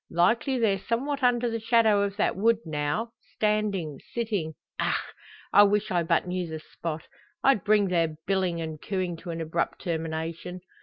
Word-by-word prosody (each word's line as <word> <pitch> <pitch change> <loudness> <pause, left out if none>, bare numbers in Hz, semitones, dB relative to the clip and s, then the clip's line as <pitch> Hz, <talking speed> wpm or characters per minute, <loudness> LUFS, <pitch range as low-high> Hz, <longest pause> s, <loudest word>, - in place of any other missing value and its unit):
Likely, 230 - +2
they're 210 -5 +2
somewhat 275 +8 -2
under 245 -1 +3
the 230 -1 -2
shadow 225 -2 +4
of 200 -1 -1
that - - +1
wood, 225 +4 +3
now 155 +9 -1 0.2
standing 210 -8 0 0.2
sitting 205 -10 -1 0.3
ach! - - +2 0.6
I 205 - +9
wish 205 0 +3
I 175 -2 +2
but 170 0 +2
knew 180 -1 -2
the 160 -1 -5
spot; 160 0 -5 0.4
I'd 265 -9 +4
bring 205 -2 +3
their 165 -3 +1
billing 185 -3 0
and 160 -2 -5
cooing 185 -3 -2
to 175 - -9
an 165 0 -3
abrupt 165 +1 -2
termination. 165 +1 -3
190 Hz, 165 wpm, -27 LUFS, 165-220 Hz, 0.6 s, I